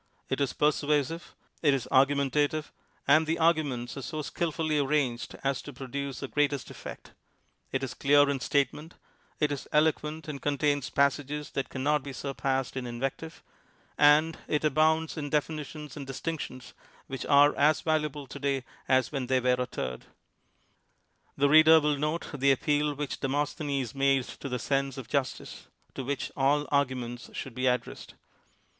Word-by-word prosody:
It -, -, -1 dB
is 140 Hz, -, 0 dB
persuasive; 150 Hz, +1 st, 0 dB, 0.3 s
it 145 Hz, -4 st, +4 dB
is 130 Hz, -, -4 dB
argumentative, 140 Hz, +3 st, +2 dB, 0.4 s
and 155 Hz, +3 st, +5 dB
the 165 Hz, +1 st, 0 dB
arguments 150 Hz, -7 st, +1 dB
are -, -, -4 dB
so 155 Hz, +3 st, -4 dB
skilfully 155 Hz, -1 st, -1 dB
arranged 135 Hz, -5 st, 0 dB
as 135 Hz, -1 st, 0 dB
to 145 Hz, -, -9 dB
produce 135 Hz, +1 st, -5 dB
the 135 Hz, -, -3 dB
greatest 145 Hz, -2 st, 0 dB
effect; -, -, -10 dB, 0.6 s
it 135 Hz, 0 st, -1 dB
is 130 Hz, -, -3 dB
clear 145 Hz, +1 st, +4 dB
in 140 Hz, -1 st, 0 dB
statement; 145 Hz, +5 st, -1 dB, 0.4 s
it 150 Hz, -2 st, +2 dB
is 140 Hz, -, -4 dB
eloquent 155 Hz, +1 st, +1 dB
and 145 Hz, -2 st, -6 dB
contains 145 Hz, -1 st, 0 dB
passages 140 Hz, +1 st, 0 dB
that 135 Hz, -, -3 dB
can 130 Hz, -, -5 dB
not 150 Hz, +1 st, +2 dB
be 140 Hz, 0 st, -7 dB
surpassed 135 Hz, -1 st, -2 dB
in 130 Hz, -2 st, -3 dB
invective; 135 Hz, +7 st, -5 dB, 0.5 s
and 150 Hz, +2 st, +5 dB
it 150 Hz, 0 st, 0 dB
abounds 155 Hz, +2 st, +2 dB
in 145 Hz, -2 st, -3 dB
definitions 150 Hz, -1 st, -3 dB
and 140 Hz, -3 st, -7 dB
distinctions 135 Hz, -2 st, -5 dB, 0.3 s
which 135 Hz, -1 st, -5 dB
are 145 Hz, 0 st, +6 dB
as 150 Hz, +1 st, +3 dB
valuable 150 Hz, -3 st, -1 dB
to 140 Hz, +2 st, -9 dB
day 140 Hz, -2 st, -1 dB, 0.2 s
as 130 Hz, -3 st, +3 dB
when 135 Hz, -4 st, -3 dB
they 130 Hz, 0 st, +3 dB
were 125 Hz, 0 st, +2 dB
uttered. 65 Hz, -, -4 dB, 1.3 s
The 140 Hz, -, +4 dB
reader 155 Hz, +2 st, +8 dB
will 150 Hz, -1 st, +1 dB
note 150 Hz, +3 st, -1 dB
the 140 Hz, -1 st, +3 dB
appeal 145 Hz, +2 st, +1 dB
which 145 Hz, -1 st, -4 dB
De -, -, -1 dB
mosthenes 140 Hz, -3 st, -2 dB
made 135 Hz, -1 st, +2 dB
to 140 Hz, -, -8 dB
the 125 Hz, -, -1 dB
sense 135 Hz, +2 st, -1 dB
of 130 Hz, -, -7 dB
justice, 140 Hz, -3 st, -3 dB, 0.3 s
to 135 Hz, -, -5 dB
which 135 Hz, 0 st, -3 dB
all 145 Hz, +2 st, +2 dB
arguments 125 Hz, -4 st, -1 dB
should 135 Hz, -, -6 dB
be 130 Hz, +2 st, -1 dB
addressed. 125 Hz, -2 st, -2 dB
140 Hz, 160 wpm, -28 LUFS, 135-150 Hz, 1.3 s, reader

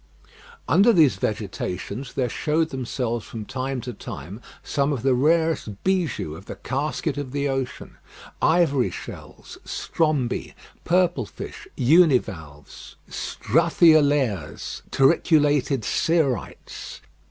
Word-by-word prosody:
Under 195 Hz, -, +5 dB
these 150 Hz, -, +4 dB
vegetations 105 Hz, +3 st, -4 dB
there 130 Hz, -2 st, 0 dB
showed 155 Hz, +6 st, 0 dB
themselves 125 Hz, -3 st, -3 dB
from 110 Hz, -2 st, -7 dB
time 130 Hz, +1 st, -3 dB
to 125 Hz, +1 st, -6 dB
time 95 Hz, -, -8 dB, 0.2 s
some 140 Hz, +1 st, 0 dB
of 135 Hz, -5 st, -3 dB
the 135 Hz, -1 st, +3 dB
rarest 155 Hz, -, +1 dB
bijoux 180 Hz, -, 0 dB
of 95 Hz, +5 st, -13 dB
the -, -, -6 dB
casket 145 Hz, +2 st, -2 dB
of 135 Hz, -3 st, -5 dB
the 145 Hz, 0 st, 0 dB
ocean; 135 Hz, -2 st, -4 dB, 0.4 s
ivory 145 Hz, -, +3 dB
shells, -, -, -10 dB
strombi, 150 Hz, -7 st, -1 dB, 0.3 s
purple 180 Hz, 0 st, +2 dB
fish, -, -, -9 dB
univalves, 120 Hz, -, +1 dB
struthiolaires, 145 Hz, -, +2 dB
turriculated 145 Hz, -3 st, +3 dB
cerites. 160 Hz, -3 st, -1 dB
135 Hz, 105 wpm, -24 LUFS, 120-155 Hz, 0.4 s, Under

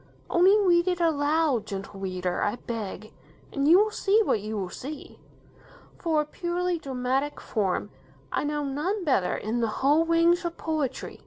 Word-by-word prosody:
Only 370 Hz, +4 st, +5 dB
read 350 Hz, -3 st, +3 dB
it 360 Hz, -1 st, 0 dB
aloud, 305 Hz, -5 st, +1 dB
Gentle 195 Hz, 0 st, -6 dB
Reader, 185 Hz, -2 st, -2 dB
I 205 Hz, -, 0 dB
beg, 215 Hz, -3 st, -6 dB, 0.4 s
and 280 Hz, 0 st, 0 dB
you 335 Hz, +4 st, +8 dB
will 425 Hz, +2 st, +3 dB
see 420 Hz, 0 st, +2 dB
what 220 Hz, -, +1 dB
you 215 Hz, +1 st, -4 dB
will 185 Hz, -3 st, -4 dB
see. 290 Hz, +3 st, -8 dB, 0.8 s
For 320 Hz, -3 st, +1 dB
a -, -, -4 dB
purely 350 Hz, +2 st, -2 dB
dramatic 265 Hz, +1 st, -2 dB
form, 200 Hz, -5 st, -2 dB, 0.4 s
I -, -, 0 dB
know 295 Hz, 0 st, -1 dB
none 310 Hz, +9 st, -2 dB
better 230 Hz, -, +1 dB
in 225 Hz, +3 st, -2 dB
the 230 Hz, -, +1 dB, 0.2 s
whole 300 Hz, +4 st, +5 dB
range 335 Hz, +1 st, +3 dB
of 340 Hz, -1 st, -4 dB
poetry. 305 Hz, -5 st, -3 dB
295 Hz, 165 wpm, -26 LUFS, 225-345 Hz, 0.8 s, you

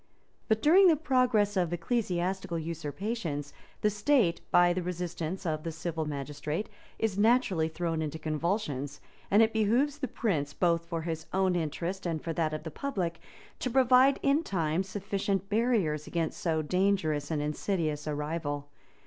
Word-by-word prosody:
But 220 Hz, -1 st, +1 dB
during 370 Hz, +6 st, +7 dB
the 330 Hz, -, +6 dB
progress 250 Hz, -8 st, +2 dB
of 175 Hz, -3 st, +1 dB
ecclesiastical 180 Hz, -2 st, -1 dB
usurpations, 160 Hz, 0 st, -4 dB, 0.3 s
the 210 Hz, -, +3 dB
state, 205 Hz, -4 st, +2 dB
by 175 Hz, 0 st, +5 dB
the 185 Hz, -, -2 dB
resistance 175 Hz, 0 st, -4 dB
of 155 Hz, -2 st, -1 dB
the 165 Hz, -, -4 dB
civil 160 Hz, 0 st, -3 dB
magistrate, 150 Hz, +5 st, -4 dB, 0.3 s
is 210 Hz, -3 st, -1 dB
naturally 215 Hz, -7 st, +3 dB
thrown 165 Hz, -1 st, -2 dB
into 155 Hz, 0 st, -3 dB
convulsions; 155 Hz, -3 st, -2 dB, 0.3 s
and 210 Hz, +3 st, +6 dB
it 225 Hz, -, +1 dB
behoves 240 Hz, +7 st, +2 dB
the 265 Hz, -, -1 dB
prince, 160 Hz, -12 st, -1 dB
both 170 Hz, -1 st, +1 dB
for 165 Hz, -1 st, -3 dB
his 160 Hz, -1 st, -4 dB
own 190 Hz, -1 st, +2 dB
interest 175 Hz, +3 st, -2 dB
and 160 Hz, -3 st, -2 dB
for 165 Hz, -, -2 dB
that 160 Hz, -1 st, 0 dB
of 155 Hz, 0 st, -4 dB
the 160 Hz, -, -6 dB
public, 180 Hz, -, -3 dB, 0.4 s
to 255 Hz, -, -1 dB
provide 260 Hz, +2 st, +5 dB
in 280 Hz, +3 st, +3 dB
time 170 Hz, -, 0 dB
sufficient 195 Hz, 0 st, -2 dB
barriers 205 Hz, -10 st, +1 dB
against 165 Hz, -2 st, -2 dB
so 160 Hz, -2 st, 0 dB
dangerous 180 Hz, -4 st, +1 dB
and 160 Hz, -2 st, -1 dB
insidious 155 Hz, -1 st, -2 dB
a 150 Hz, -, -1 dB
rival. 145 Hz, -1 st, -3 dB
175 Hz, 155 wpm, -30 LUFS, 155-210 Hz, 0.4 s, during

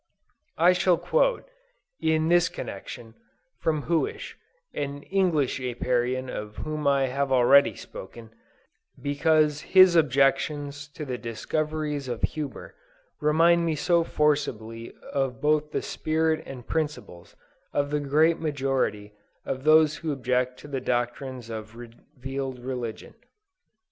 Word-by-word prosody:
I 175 Hz, +3 st, +6 dB
shall 180 Hz, -1 st, +3 dB
quote, -, -, +1 dB, 0.5 s
in 160 Hz, 0 st, +1 dB
this 175 Hz, +1 st, +4 dB
connection, 115 Hz, -3 st, -8 dB, 0.5 s
from 155 Hz, -3 st, 0 dB
Huish, 165 Hz, -1 st, -1 dB, 0.4 s
an 145 Hz, 0 st, -4 dB
English 175 Hz, -9 st, +1 dB
Apiarian 125 Hz, 0 st, -1 dB
of 105 Hz, -3 st, -6 dB
whom 155 Hz, -1 st, -3 dB
I 140 Hz, -1 st, +3 dB
have 135 Hz, +1 st, -1 dB
already 135 Hz, +2 st, +5 dB
spoken, 115 Hz, +3 st, -10 dB, 0.7 s
because 150 Hz, +1 st, +2 dB
his 185 Hz, +1 st, +6 dB
objections 145 Hz, 0 st, +1 dB
to 150 Hz, -, -5 dB
the 125 Hz, -3 st, -4 dB
discoveries 150 Hz, +4 st, -3 dB
of 120 Hz, -2 st, -5 dB
Huber, 150 Hz, -2 st, -4 dB, 0.5 s
remind 165 Hz, +3 st, +4 dB
me 165 Hz, -2 st, 0 dB
so 170 Hz, +3 st, +2 dB
forcibly 120 Hz, -8 st, -1 dB, 0.2 s
of 135 Hz, -4 st, -1 dB
both 150 Hz, 0 st, +1 dB
the -, -, -2 dB
spirit 160 Hz, 0 st, 0 dB
and 125 Hz, -3 st, -9 dB
principles 150 Hz, -, -4 dB, 0.4 s
of 145 Hz, 0 st, -1 dB
the 150 Hz, -, +1 dB
great 155 Hz, +4 st, +3 dB
majority 135 Hz, -9 st, -1 dB, 0.3 s
of 130 Hz, +1 st, -4 dB
those 155 Hz, 0 st, +5 dB
who 160 Hz, -2 st, -3 dB
object 125 Hz, -2 st, -1 dB
to -, -, -11 dB
the 135 Hz, -3 st, -3 dB
doctrines 120 Hz, 0 st, -2 dB
of 110 Hz, 0 st, -7 dB
revealed 130 Hz, +2 st, -7 dB
religion. 125 Hz, -2 st, -6 dB
140 Hz, 125 wpm, -26 LUFS, 125-155 Hz, 0.7 s, I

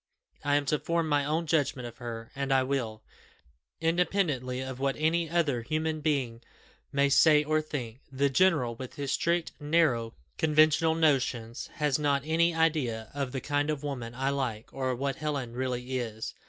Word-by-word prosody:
I 145 Hz, 0 st, +2 dB
am 145 Hz, 0 st, +1 dB
to 150 Hz, +1 st, +1 dB
form 170 Hz, -1 st, 0 dB
my 145 Hz, -1 st, +2 dB
own 160 Hz, +3 st, 0 dB
judgment 145 Hz, -5 st, 0 dB
of 120 Hz, -, -11 dB
her, 115 Hz, -2 st, -7 dB
and 140 Hz, 0 st, -2 dB
I 135 Hz, -1 st, +4 dB
will, 120 Hz, -5 st, -2 dB, 0.8 s
independently 165 Hz, -7 st, 0 dB
of 130 Hz, -1 st, -5 dB
what 135 Hz, 0 st, 0 dB
any 160 Hz, +1 st, +1 dB
other 155 Hz, -8 st, +1 dB
human 155 Hz, +4 st, -2 dB
being 135 Hz, -7 st, -1 dB, 0.5 s
may 140 Hz, 0 st, +3 dB
say 150 Hz, +2 st, +5 dB
or 155 Hz, +1 st, +1 dB
think. 130 Hz, -6 st, -6 dB
The 140 Hz, +1 st, +2 dB
general, 140 Hz, -4 st, +3 dB
with 125 Hz, +2 st, -8 dB
his 140 Hz, -1 st, -3 dB
strict, 170 Hz, +3 st, 0 dB
narrow, 145 Hz, -7 st, +1 dB, 0.2 s
conventional 155 Hz, +1 st, +4 dB
notions, 130 Hz, -6 st, 0 dB
has 150 Hz, -2 st, +1 dB
not 140 Hz, -2 st, +1 dB
an 165 Hz, +2 st, +2 dB
idea 140 Hz, -9 st, 0 dB
of 140 Hz, -2 st, -3 dB
the 130 Hz, -1 st, -4 dB
kind 145 Hz, +2 st, 0 dB
of 150 Hz, -2 st, -2 dB
woman 125 Hz, -5 st, -5 dB
I 135 Hz, +2 st, 0 dB
like, 125 Hz, -6 st, -3 dB
or 130 Hz, -1 st, -2 dB
of 125 Hz, -, -1 dB
what 140 Hz, +2 st, -2 dB
Helen 145 Hz, -7 st, -3 dB
really 130 Hz, 0 st, -2 dB
is. 110 Hz, -2 st, -5 dB
140 Hz, 175 wpm, -29 LUFS, 125-155 Hz, 0.8 s, say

